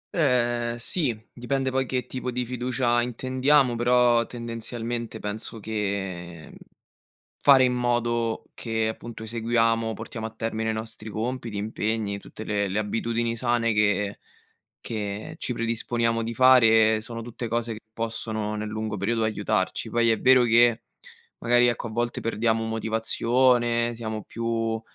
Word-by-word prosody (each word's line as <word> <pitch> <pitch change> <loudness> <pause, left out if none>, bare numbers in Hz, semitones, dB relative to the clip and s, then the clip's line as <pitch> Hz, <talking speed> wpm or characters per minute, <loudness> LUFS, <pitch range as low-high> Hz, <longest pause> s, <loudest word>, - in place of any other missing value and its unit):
Ehm, 120 -5 +1
sì, 120 -2 0
dipende 130 +2 -1
poi 130 -1 0
che 125 -2 -2
tipo 125 0 -5
di 125 0 -2
fiducia 120 0 0
intendiamo, 130 +2 +2
però, 120 0 +4
tendenzialmente, 115 0 -5
penso 110 +2 -4
che, 95 -6 -4
mhmm, - - -15 0.8
fare 135 -2 +6
in 125 - +2
modo 120 -2 0
che 110 -1 -1
appunto 110 +1 -7
eseguiamo, 115 0 +1
portiamo 110 +1 -7
a 110 - -3
termine 110 0 -3
i - - 0
nostri 110 0 -6
compiti, 115 0 -3
impegni, 105 -1 -2
tutte 110 - -10
le 100 -2 -1
le 100 +3 -1
abitudini 115 +2 -1
sane 120 -1 +1
che 105 -1 +1 0.6
che 110 +6 -5
ci 125 - -1
predisponiamo 115 0 0
di 115 - -3
fare, 115 -3 +5
sono 115 0 -5
tutte 120 +1 -6
cose 115 0 -1
che 110 - -10
possono 110 -2 -3
nel 105 0 -4
lungo 110 0 -3
periodo 110 +4 0
aiutarci. 105 0 -1
Poi 115 0 +2
è 110 - +2
vero 130 -1 +6
che, 120 0 +4 0.6
magari, 120 +1 +4
ecco, 120 - -1
a - - -8
volte 120 +1 -2
perdiamo 115 0 0
motivazione, 120 +2 +1
siamo 110 -2 -5
più 115 -1 -2
115 Hz, 140 wpm, -25 LUFS, 110-120 Hz, 0.8 s, fare